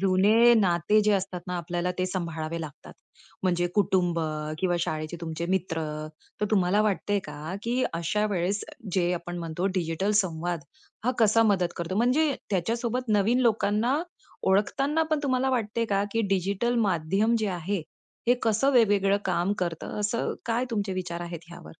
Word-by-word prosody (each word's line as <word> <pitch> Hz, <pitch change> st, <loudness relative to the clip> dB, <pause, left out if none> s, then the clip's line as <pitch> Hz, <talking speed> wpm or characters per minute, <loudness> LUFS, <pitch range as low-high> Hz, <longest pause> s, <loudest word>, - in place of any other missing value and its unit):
जुने 205 Hz, +5 st, +5 dB
नाते 195 Hz, 0 st, +3 dB
जे 210 Hz, -, +5 dB
असतातना 180 Hz, -2 st, -2 dB
आपल्याला 175 Hz, +1 st, -2 dB
ते 185 Hz, -, +1 dB
सांभाळावे 165 Hz, -3 st, -3 dB
लागतात. 155 Hz, -4 st, -9 dB, 0.5 s
म्हणजे 175 Hz, -2 st, +1 dB
कुटुंब 180 Hz, -4 st, +2 dB, 0.4 s
किंवा 175 Hz, 0 st, +1 dB
शाळेचे 155 Hz, 0 st, -3 dB
तुमचे 165 Hz, 0 st, -4 dB
मित्र. 175 Hz, -3 st, -1 dB, 0.6 s
तर -, -, +2 dB
तुम्हाला 195 Hz, -1 st, +3 dB
वाटतंय 205 Hz, -1 st, +1 dB
का, 150 Hz, +4 st, -6 dB
की 245 Hz, +2 st, 0 dB
अशा 170 Hz, +6 st, 0 dB
वेळेस 195 Hz, +2 st, -1 dB, 0.3 s
जे 180 Hz, -1 st, +2 dB
आपण 175 Hz, 0 st, -5 dB
म्हणतो 170 Hz, +2 st, -2 dB
डिजिटल 175 Hz, +2 st, 0 dB
संवाद 170 Hz, -1 st, -3 dB, 0.4 s
हा 250 Hz, -, +3 dB
कसा 225 Hz, 0 st, +5 dB
मदत 180 Hz, -3 st, 0 dB
करतो? 170 Hz, +2 st, -3 dB
म्हणजे, 270 Hz, +6 st, +3 dB, 0.2 s
त्याच्यासोबत 230 Hz, +6 st, -1 dB
नवीन 235 Hz, +6 st, +2 dB
लोकांना 230 Hz, +3 st, +2 dB, 0.5 s
ओळखताना 270 Hz, +11 st, +2 dB
पण 310 Hz, -, +2 dB
तुम्हाला 265 Hz, -1 st, +1 dB
वाटतंय 230 Hz, -2 st, 0 dB
का, 200 Hz, 0 st, +2 dB
की 225 Hz, -, +1 dB
डिजिटल 200 Hz, +6 st, 0 dB
माध्यम 195 Hz, +6 st, +1 dB
जे 215 Hz, -, 0 dB
आहे, 180 Hz, 0 st, -2 dB, 0.5 s
हे 245 Hz, -, +6 dB
कसं 225 Hz, +5 st, +3 dB
वेगवेगळं 200 Hz, -5 st, +4 dB
काम 180 Hz, +1 st, +1 dB
करतं? 175 Hz, +2 st, -3 dB
असं 210 Hz, +3 st, -1 dB
काय 235 Hz, +2 st, +1 dB
तुमचे 205 Hz, -4 st, -1 dB
विचार 180 Hz, -2 st, -4 dB
आहेत, 170 Hz, -1 st, -6 dB
ह्यावर? 170 Hz, 0 st, -11 dB
190 Hz, 150 wpm, -27 LUFS, 175-220 Hz, 0.6 s, हे